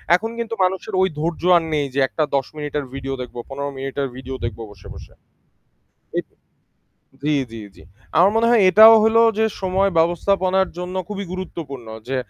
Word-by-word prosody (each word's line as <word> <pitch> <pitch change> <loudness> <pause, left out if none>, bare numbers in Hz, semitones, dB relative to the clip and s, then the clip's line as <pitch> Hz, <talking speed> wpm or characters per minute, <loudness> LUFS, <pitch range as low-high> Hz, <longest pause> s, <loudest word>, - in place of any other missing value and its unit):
এখন 225 +4 -2
কিন্তু 230 -1 -4
মানুষের 190 +3 -2
ওই 190 - +4
ধৈর্য 165 +1 -2 0.2
আর 165 - 0
নেই 145 -2 +1
যে 140 - -1
একটা 155 - -1
১০ 135 - 0
মিনিটের 145 -1 -3
ভিডিও 135 0 -5
দেখব, 125 - -9
১৫ 140 +1 -4
মিনিটের 135 +1 -3
ভিডিও 130 0 -7
দেখব 115 -1 -4
বসে, 100 - -15
বসে। - - -13 1.1
এট - - -3 1.0
জী, 150 0 +1 0.2
জী, 115 -1 -8
জী। - - -16 0.4
আমার 185 +3 +6
মনে 230 +1 +3
হয় 235 -3 +5
এটাও 220 +4 +9
হলো 225 +1 +4 0.2
যে 220 - +3 0.2
সময় 190 +1 +1
ব্যবস্থাপনার 185 +3 +1
জন্য 180 +1 -5
খুবই 200 -1 -5
গুরুত্বপূর্ণ 155 -9 -7 0.2
যে 135 - -1
170 Hz, 170 wpm, -21 LUFS, 135-195 Hz, 1.1 s, এটাও